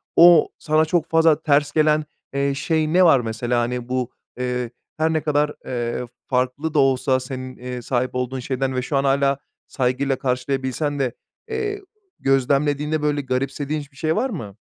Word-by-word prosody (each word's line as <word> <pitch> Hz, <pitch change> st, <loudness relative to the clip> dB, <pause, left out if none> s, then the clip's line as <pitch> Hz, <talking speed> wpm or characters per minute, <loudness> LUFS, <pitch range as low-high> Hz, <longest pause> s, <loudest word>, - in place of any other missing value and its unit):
o, 175 Hz, 0 st, +7 dB
sana 155 Hz, 0 st, +2 dB
çok 160 Hz, 0 st, +1 dB
fazla 160 Hz, -1 st, +4 dB
ters 145 Hz, -1 st, +3 dB
gelen, 155 Hz, 0 st, +3 dB, 0.3 s
eee, 140 Hz, 0 st, +1 dB
şey 155 Hz, +2 st, 0 dB
ne 185 Hz, +1 st, +6 dB
var 150 Hz, -6 st, +6 dB
mesela? 120 Hz, +1 st, -1 dB
Hani 120 Hz, 0 st, -3 dB
bu, 125 Hz, -1 st, -1 dB, 0.3 s
eee, 125 Hz, -1 st, -2 dB, 0.3 s
her 160 Hz, +1 st, +1 dB
ne 155 Hz, -, +1 dB
kadar, 150 Hz, -1 st, +1 dB
eee, 120 Hz, 0 st, -2 dB, 0.2 s
farklı 130 Hz, +5 st, -1 dB
da 150 Hz, -, +3 dB
olsa 130 Hz, -1 st, +3 dB
senin, 130 Hz, 0 st, -7 dB
eee, 125 Hz, 0 st, -6 dB
sahip 125 Hz, +1 st, -1 dB
olduğun 125 Hz, +1 st, -2 dB
şeyden 130 Hz, +1 st, -2 dB
ve 125 Hz, -, 0 dB
şu 140 Hz, +3 st, -1 dB
an 135 Hz, -, +1 dB
hâlâ 140 Hz, 0 st, +2 dB, 0.3 s
saygıyla 130 Hz, +1 st, 0 dB
karşılayabilsen 130 Hz, +3 st, -1 dB
de, 130 Hz, -3 st, 0 dB, 0.4 s
eee, 420 Hz, -2 st, -2 dB, 0.4 s
gözlemlediğinde 145 Hz, +3 st, +1 dB
böyle 145 Hz, -1 st, +1 dB
garipsediğin 135 Hz, +3 st, -2 dB
hiç 145 Hz, 0 st, -13 dB
bir 135 Hz, -, -22 dB
şey 160 Hz, +2 st, 0 dB
var 255 Hz, +5 st, 0 dB
mı? 110 Hz, -, -7 dB
135 Hz, 170 wpm, -22 LUFS, 125-150 Hz, 0.4 s, o